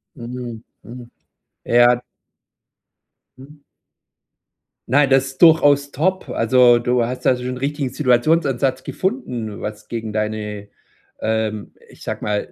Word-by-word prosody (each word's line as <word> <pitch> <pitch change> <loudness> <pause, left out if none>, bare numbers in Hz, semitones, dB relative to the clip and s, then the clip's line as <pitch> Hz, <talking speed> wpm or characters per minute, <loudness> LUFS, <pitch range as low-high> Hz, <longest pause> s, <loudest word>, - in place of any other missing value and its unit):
Mhm, 120 -2 -7 0.2
mhm, 120 0 -11 0.6
ja. 120 +1 +4 1.4
Mhm. 145 +3 -15 1.3
Nein, 140 +2 +3
das 135 0 +3
ist 135 0 -11
durchaus 145 -4 +5
top. 185 +7 -1
Also, 120 +1 +4
du 120 0 0
hast 125 +2 -5
da 130 - +4
so 125 - -8
'n 125 0 -4
richtigen 140 +1 -2
Situationsansatz 135 +1 +1
gefunden, 125 - -4
was 105 0 -7
gegen 110 -2 -5
deine, 105 -1 -4 0.5
ähm, 110 -1 -2 0.2
ich - - -16
sage - - -5
ma 105 0 0
125 Hz, 120 wpm, -20 LUFS, 115-140 Hz, 1.4 s, durchaus